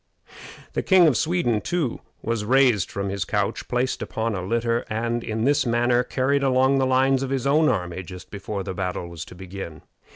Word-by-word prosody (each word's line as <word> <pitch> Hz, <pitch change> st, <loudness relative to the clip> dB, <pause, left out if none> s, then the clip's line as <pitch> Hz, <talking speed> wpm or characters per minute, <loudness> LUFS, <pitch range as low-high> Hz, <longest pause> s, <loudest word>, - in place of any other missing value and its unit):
The -, -, 0 dB
King 190 Hz, -2 st, +5 dB
of 150 Hz, -6 st, +4 dB
Sweden, 155 Hz, -10 st, +1 dB
too, 165 Hz, -9 st, -2 dB, 0.2 s
was 115 Hz, -2 st, -1 dB
raised 125 Hz, -3 st, +3 dB
from 100 Hz, 0 st, -3 dB
his 100 Hz, -1 st, -2 dB
couch, -, -, -2 dB
placed 125 Hz, +1 st, -1 dB
upon 115 Hz, 0 st, -2 dB
a 95 Hz, -, -3 dB
litter, 115 Hz, +4 st, 0 dB
and 115 Hz, +2 st, -1 dB
in 110 Hz, 0 st, -2 dB
this 140 Hz, +3 st, +3 dB
manner 120 Hz, 0 st, +2 dB
carried 135 Hz, +3 st, 0 dB
along 135 Hz, 0 st, +3 dB
the 130 Hz, -, +2 dB
lines 130 Hz, +1 st, +3 dB
of 135 Hz, -, -2 dB
his 135 Hz, -2 st, -1 dB
own 150 Hz, +3 st, +4 dB
army 90 Hz, -6 st, -2 dB
just 90 Hz, +1 st, -11 dB
before 100 Hz, 0 st, -4 dB
the 95 Hz, 0 st, -4 dB
battle 90 Hz, -2 st, -3 dB
was 85 Hz, -1 st, -7 dB
to -, -, -12 dB
begin. 95 Hz, -3 st, -8 dB
120 Hz, 195 wpm, -24 LUFS, 100-135 Hz, 0.2 s, King